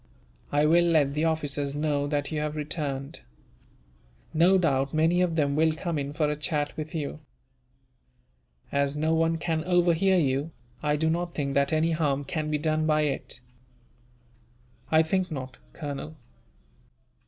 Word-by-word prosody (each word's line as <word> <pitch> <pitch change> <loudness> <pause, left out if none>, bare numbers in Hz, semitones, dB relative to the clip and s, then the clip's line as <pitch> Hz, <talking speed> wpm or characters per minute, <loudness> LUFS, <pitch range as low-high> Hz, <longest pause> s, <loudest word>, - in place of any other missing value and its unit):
I 145 +1 +3
will 170 +3 +5
let 155 -5 +3
the 155 +2 0
officers 145 -3 -1
know 145 -1 0
that 145 0 -1
you 155 - -1
have 150 0 -2
returned. 145 -3 -4 1.1
No 175 +4 +5
doubt 140 -5 +1
many 165 +3 +3
of 175 -3 +1
them 140 -3 +1
will 160 +1 +3
come 160 0 -3
in 140 0 -3
for 150 0 0
a 150 - -1
chat 150 0 -2
with 155 +1 -6
you. 150 -1 -4 1.5
As 140 +1 0
no 160 +2 +1
one 165 0 +2
can 160 -1 -1
overhear 180 +1 +3
you, 145 0 0 0.3
I 150 0 +1
do 160 +2 0
not 170 +1 -1
think 140 -2 -2
that 140 0 +2
any 160 +1 +2
harm 145 -3 0
can 155 +1 -3
be 150 - +1
done 155 +1 0
by 155 0 +3
it." 140 -4 -2 1.5
"I 160 0 +5
think 185 +3 0
not, 130 -4 -6
Colonel." 150 +1 -6
155 Hz, 155 wpm, -27 LUFS, 145-165 Hz, 1.5 s, will